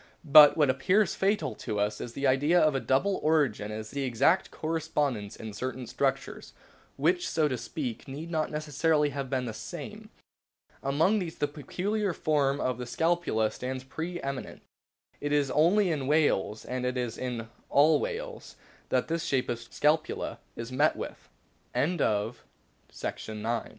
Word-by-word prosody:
But 150 0 +9
what 145 -4 +4
appears 185 +11 +2
fatal 195 - 0
to 105 - -3
us 105 +1 0
to - - -4
the 135 +4 -4
idea 145 +6 +4
of 155 -3 +4
a 135 - 0
double 175 +11 +1
origin 140 -10 +1
is 110 0 -6
the 140 - -3
exact 130 +8 +2
correspondence 150 -9 -2
in 110 -1 -8
certain 130 +3 -4
structures, - - -2 0.4
which, 175 +5 +1
so 155 -2 +2
to 130 - -1
speak, 125 -1 -5
need 150 +5 -7
not 155 -2 0
necessarily 150 0 +1
have 140 -2 -4
been 130 -1 -1
the 115 - -4
same. - - -8 0.7
Among 160 +10 +2
these 170 -4 -5
the 145 - +1
peculiar 185 +7 -2
form 145 -3 +1
of 125 -3 -1
the 125 - -5
scapula 160 -8 +1
stands 130 +1 -5
pre 165 +6 -5
eminent. 135 -1 -5 0.6
It 145 0 -3
is 145 -2 +2
only 180 +5 +4
in 140 -4 -2
whales, 145 -9 +1
and 125 0 -3
it 125 0 -1
is 120 -2 -2
in 120 -3 -4 0.2
all 150 +3 +5
whales, - - -5 0.3
that - - +1
this 165 0 -1
shape 130 -2 0
of 120 - -1
sc 115 - -8
145 Hz, 145 wpm, -29 LUFS, 125-160 Hz, 0.7 s, But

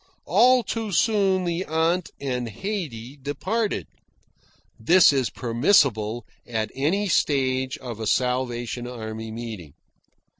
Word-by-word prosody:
All 245 +6 +5
too 225 -1 -3
soon 195 -2 +2
the 170 +1 -1
aunt 165 +3 0
and 125 -4 -3
Haydee 135 - -5
departed. 185 - -2 0.9
(This 170 +7 +6
is 130 -3 +1
permissible 120 - +2 0.2
at 110 -2 -2
any 175 +10 0
stage 130 -5 +1
of 120 -4 -8
a 110 - -3
Salvation 125 -1 -1
Army 110 -2 -6
meeting.) 110 -9 -7
130 Hz, 110 wpm, -24 LUFS, 115-185 Hz, 0.9 s, This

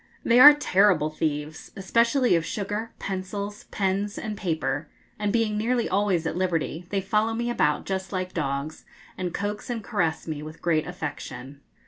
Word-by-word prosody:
They 235 +1 +5
are 290 +3 +11
terrible 185 - +3
thieves, 155 0 -3
especially 235 +6 +2
of 165 - +1
sugar, 210 +5 -3
pencils, 200 +2 -5
pens, 200 +1 -1
and 215 -2 -4
paper, 160 -6 -2 0.3
and 210 -1 0
being 220 -2 +1
nearly 235 +2 +1
always 190 -4 +1
at 160 - -2
liberty, 175 -2 -1
they 200 -1 0
follow 215 +3 +1
me 240 +1 -1
about 150 -10 +1
just 190 -1 -3
like 185 -1 -3
dogs, 140 -1 -3 0.3
and 180 -1 -3
coax 205 +6 -4
and 230 -3 -3
caress 165 -5 -1
me 155 -2 -4
with 155 +1 -9
great 160 -3 +1
affection. 145 -5 -7
190 Hz, 160 wpm, -26 LUFS, 160-210 Hz, 0.3 s, are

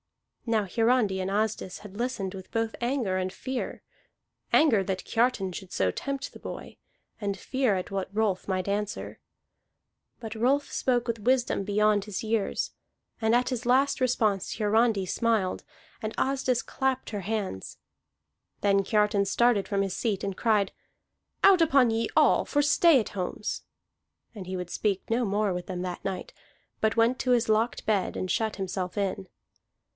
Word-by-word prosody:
Now 220 -3 +2
Hiarandi 225 -1 +2
and 185 - -2
Asdis 210 -2 -1
had 205 -2 -12
listened 215 -5 -2
with 190 -1 -10
both 225 0 -1
anger 240 -6 0
and 185 0 -1
fear, 260 +5 -5 0.7
anger 240 -11 +5
that 190 0 -3
Kiartan 230 -6 +1
should 190 0 -8
so 95 -1 +1
tempt 275 - -4
the - - -11
boy, - - -8 0.5
and 200 -1 -2
fear 255 +1 0
at 185 +1 -4
what 195 0 -3
Rolf 210 -3 0
might 185 -1 -1
answer. 205 +1 -3 1.0
But 225 -2 -6
Rolf 270 +5 +1
spoke 245 -2 0
with 230 -1 -2
wisdom 245 -2 +1
beyond 210 0 +2
his 210 -1 -4
years; 220 -2 -1 0.5
and 220 +1 +3
at 250 +1 +2
his 255 -1 -3
last 270 +2 +3
response 220 -6 +1
Hiarandi 215 -1 +2
smiled, 220 -1 0 0.4
and 215 0 -4
Asdis 260 -2 +1
clapped 265 -1 -2
her 205 -2 -3
hands. 195 - -4 0.8
Then 200 -1 +3
Kiartan 210 -1 +2
started 230 0 +2
from 200 -1 +1
his 195 -2 -3
seat 215 -5 -1
and 195 -1 -2
cried: 210 -3 +2 0.7
"Out 385 -3 +7
upon 275 -7 +5
ye 225 +1 0
all - - +5
for 290 0 +1
stay 295 0 +5
at 220 - -3
homes!" 195 +2 -4 0.7
And 195 -5 -8
he 185 0 -3
would 180 -1 -5
speak 200 -3 -1
no 235 +2 +1
more 205 -1 +1
with 180 0 -5
them 180 -1 -4
that 180 -1 -5
night, 190 -2 -4 0.5
but 220 +1 +1
went 230 +3 +3
to 255 - 0
his 240 -2 +3
locked 220 +2 +1
bed 205 -4 0
and 185 - -3
shut 220 +2 0
himself 185 -1 -4
in. 195 -1 -2
215 Hz, 165 wpm, -27 LUFS, 195-240 Hz, 1.0 s, Out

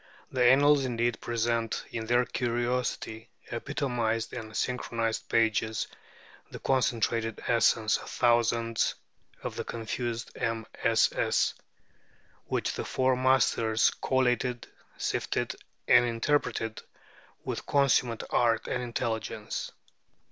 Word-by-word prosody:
The 130 -1 +1
Annals 140 +3 +6
indeed 120 -2 -1
present 115 -1 -1
in 110 -1 -4
their 120 +1 +3
curiously 120 -2 -2 0.2
epitomized 120 -3 -1
and 110 -2 -6
synchronized 115 -3 -2
pages 110 -1 +1 0.6
the - - -8
concentrated 115 -3 0
essence 115 -2 +3
of - - -10
thousands 115 -1 +2 0.5
of - - -4
the - - -3
confused 115 +1 -4
MSS. 115 -1 +1 0.9
which - - -1
the - - -3
Four 130 0 +2
Masters 120 -3 +3
collated, 125 -2 +1 0.3
sifted, - - -1 0.3
and 125 - +7
interpreted 115 -1 0 0.6
with - - -4
consummate 125 -4 +2
art 115 -2 +2
and 125 - -1
intelligence. 115 -3 -3
120 Hz, 95 wpm, -29 LUFS, 115-125 Hz, 0.9 s, and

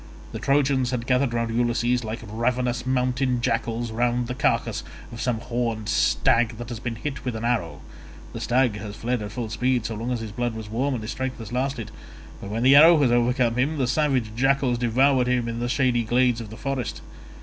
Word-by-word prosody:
The - - -5
Trojans 135 -2 +2
had 125 -2 -3
gathered 125 0 +2
round 115 -1 -1
Ulysses 120 +1 +1
like 110 +1 -5
ravenous 120 +3 -1
mountain 125 0 +1
jackals 120 -1 -1
round 120 +1 0
the 125 - -4
carcase 115 -4 0 0.3
of 115 - -7
some 125 -3 0
horned 115 -3 -2
stag 115 -1 +2
that 120 0 -7
has 120 -3 -5
been 115 0 -4
hit 140 +4 -5
with 125 -3 -3
an 110 +1 -4
arrow—the 85 - -5
stag 125 -3 +2
has 105 0 -7
fled 120 +2 -2
at 105 -1 -6
full 115 0 -4
speed 125 +1 0
so 115 - -3
long 115 +3 -4
as 120 -2 -2
his 110 -2 -6
blood 120 +1 -2
was 110 -1 -7
warm 130 +4 0
and 115 - -5
his 110 - -4
strength 130 0 -4
has 115 -1 -8
lasted, 125 -4 -2 0.5
but 100 - -7
when 115 +3 -2
the 135 +2 +7
arrow 160 +2 +8
has 135 -4 +3
overcome 120 0 +2
him, 145 +5 +1
the 135 - +1
savage 130 -4 +1
jackals 135 -1 +2
devour 130 +3 +3
him 125 -2 +1
in 115 0 -4
the 120 0 -2
shady 125 -1 +2
glades 120 +1 +2
of 110 - -8
the 110 - -10
forest. 135 -2 -3
120 Hz, 210 wpm, -24 LUFS, 115-130 Hz, 0.5 s, arrow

